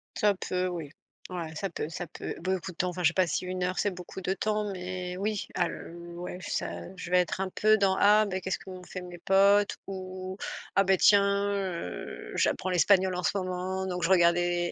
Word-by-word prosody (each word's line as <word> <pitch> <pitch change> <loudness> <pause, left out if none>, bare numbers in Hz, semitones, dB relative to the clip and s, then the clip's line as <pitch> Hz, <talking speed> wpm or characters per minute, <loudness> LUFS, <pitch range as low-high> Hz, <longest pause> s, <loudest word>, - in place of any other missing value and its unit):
Ça 210 -1 +3
peut, 185 0 -1
oui. 170 -5 -4 0.4
Ouais, 170 -3 -5
ça 195 +5 -2
peut 150 - -4
ça 170 +1 -5
peut, - - -6
beaucoup 185 +1 -2
de 170 - -18
temps, 180 - +1
enfin, 180 0 -4
je 155 - +6
sais - - -7
pas 185 -1 +3
si 165 - -1
1 185 0 -3
heure 185 +1 -1
c'est 205 - +1
beaucoup 180 +1 -8
de 185 - -1
temps 210 0 -1
mais 180 -1 -5
oui, 205 +1 -2
al 175 -2 -2 0.2
ouais, 180 +1 -6
ça, - - -2
heu, 190 - -10
je 180 -1 -7
vais 180 - +5
être 180 +1 +1
un 190 - -1
peu 215 0 +4
dans 195 -2 +2
«Ah, 210 +1 +6
ben, 190 -2 -2
qu'est-ce 190 +1 -2
qu'ont 185 -1 -10
fait 185 +1 -7
mes 180 -1 -9
potes» 200 +3 +4
ou 185 0 -6 0.4
«Ah, 195 - +5
ben, 190 0 +5
tiens, 200 0 +4
heu, 185 - -4
j'apprends 185 - +1
l'espagnol 185 +1 +4
en 180 0 -3
ce - - +3
moment 185 0 -2
donc 180 -1 -3
je 165 - +2
regarde 170 -2 +6
les 175 0 0
185 Hz, 225 wpm, -29 LUFS, 180-195 Hz, 0.4 s, je